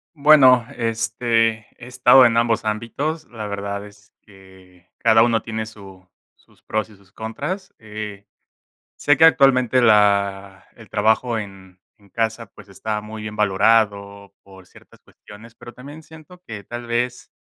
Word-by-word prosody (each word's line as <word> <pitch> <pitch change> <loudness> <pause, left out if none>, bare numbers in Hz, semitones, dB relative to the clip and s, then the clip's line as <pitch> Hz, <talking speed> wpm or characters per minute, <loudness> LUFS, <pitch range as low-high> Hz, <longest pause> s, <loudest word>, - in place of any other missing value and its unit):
Bueno, 135 -5 +5
este, 115 -1 -1
he 120 - -12
estado 125 +1 +5
en 115 -1 0
ambos 115 -1 +1
ámbitos, 135 +9 -4
la 110 -3 -7
verdad 100 0 -5
es 105 0 -19
que 95 -3 -20
cada 115 0 +4
uno 115 -1 +2
tiene 110 -1 -5
su 95 -4 -14 0.3
sus - - -29
pros 110 0 -3
y 105 - -17
sus 100 0 -26
contras, 180 - -6
eh, 105 -2 -9 0.7
sé 145 - +2
que 160 - +4
actualmente 130 -5 +4
la 100 -3 +1
el - - -17
trabajo 115 +1 +1
en 95 -3 -10 0.2
en 100 -1 -24
casa, 115 +3 -3
pues, 100 0 -18
está 105 +2 -5
muy 110 +1 -9
bien 105 0 -7
valorado 100 -1 0
por 95 -2 -17
ciertas - - -20
cuestiones, 110 +2 -16
pero 120 +1 -13
también 145 +6 -12
siento 160 +3 -16
que 105 - -9
tal 120 +3 -8
vez 120 +1 -3
110 Hz, 150 wpm, -20 LUFS, 100-120 Hz, 0.7 s, Bueno